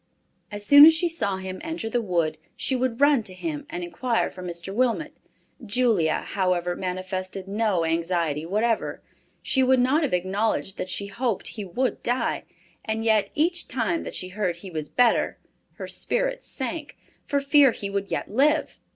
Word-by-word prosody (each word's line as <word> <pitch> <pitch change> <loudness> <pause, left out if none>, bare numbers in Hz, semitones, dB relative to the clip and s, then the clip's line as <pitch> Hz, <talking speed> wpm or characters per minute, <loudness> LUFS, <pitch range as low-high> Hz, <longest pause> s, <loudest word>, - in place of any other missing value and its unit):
As 205 0 -5
soon 285 +5 +10
as 325 - +7
she 345 +2 +1
saw 265 - -2
him 190 0 -6
enter 325 -7 -4
the 240 +2 0
wood, 170 -6 -1 0.2
she 265 - 0
would 250 -1 -1
run 285 -3 +5
to 190 -4 -8
him, 295 - -5
and 345 +1 -5
inquire 255 -9 -1
for 185 - -10
Mr. 175 +1 -5
Wilmot. 240 +1 0 0.5
Julia, 220 -8 +1
however, 180 -2 0
manifested 185 +1 -4
no 200 -4 0
anxiety 165 -2 0
whatever. 215 +6 -1 0.4
She 265 - +2
would 260 0 +4
not 260 +6 +3
have 290 - -1
acknowledged 195 +2 -1
that 185 - -3
she 200 - -2
hoped 220 +1 -2
he 215 - -6
would 250 +8 -2
die, 245 +2 -1 0.4
and 220 +1 -2
yet 215 -3 +3
each 340 +4 0
time 215 -9 -1
that - - -7
she 185 - -4
heard 185 -2 -1
he 185 +2 -10
was 155 -2 -4
better 245 -2 +2 0.4
her - - -7
spirits - - -1
sank, 295 +3 -4 0.3
for 285 - +1
fear 280 0 +5
he 200 -3 -5
would 200 0 -2
yet - - -2
live. 295 +7 +2
220 Hz, 175 wpm, -25 LUFS, 185-265 Hz, 0.5 s, soon